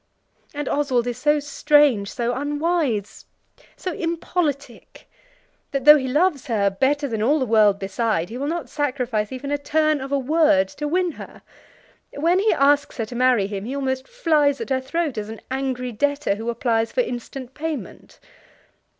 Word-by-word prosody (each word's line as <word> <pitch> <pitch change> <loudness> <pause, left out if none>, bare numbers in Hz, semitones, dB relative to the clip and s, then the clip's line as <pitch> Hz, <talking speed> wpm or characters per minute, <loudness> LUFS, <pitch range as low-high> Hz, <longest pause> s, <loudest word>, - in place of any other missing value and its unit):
And 295 -1 -4
Oswald 260 -5 +1
is 245 0 -4
so 295 +2 +2
strange, 290 -7 +3
so 240 -1 -2
unwise, 290 - -1 0.5
so 365 - -4
impolitic, 325 -5 -3 0.6
that 275 -2 -3
though 300 0 +10
he 260 - -3
loves 295 +1 +1
her 205 -5 +1
better 280 +8 0
than 225 -4 -3
all 280 +8 +3
the 265 - 0
world 215 -3 +4
beside, 195 -2 -1
he 235 - -6
will 280 - -2
not 335 +2 -3
sacrifice 250 -7 -2
even 260 +2 -5
a 290 - 0
turn 310 0 +1
of 270 +1 -6
a 280 - +2
word 300 +1 +3
to 295 +1 -5
win 360 +3 +1
her. - - -12 0.7
When 335 +5 +2
he 430 +2 +3
asks 285 +1 +2
her 225 - -1
to 240 - -9
marry 250 -4 +3
him, 200 -1 -5
he 260 +4 -4
almost 265 -1 -2
flies 305 - +1
at - - -6
her 260 0 +1
throat, 300 -2 -2
as 210 0 -6
an 225 - -8
angry 260 -2 -2
debtor 285 +1 0
who 225 +3 -5
applies 230 -1 0
for - - +1
instant 255 - -6
payment. 315 0 -6
275 Hz, 175 wpm, -22 LUFS, 235-295 Hz, 0.7 s, though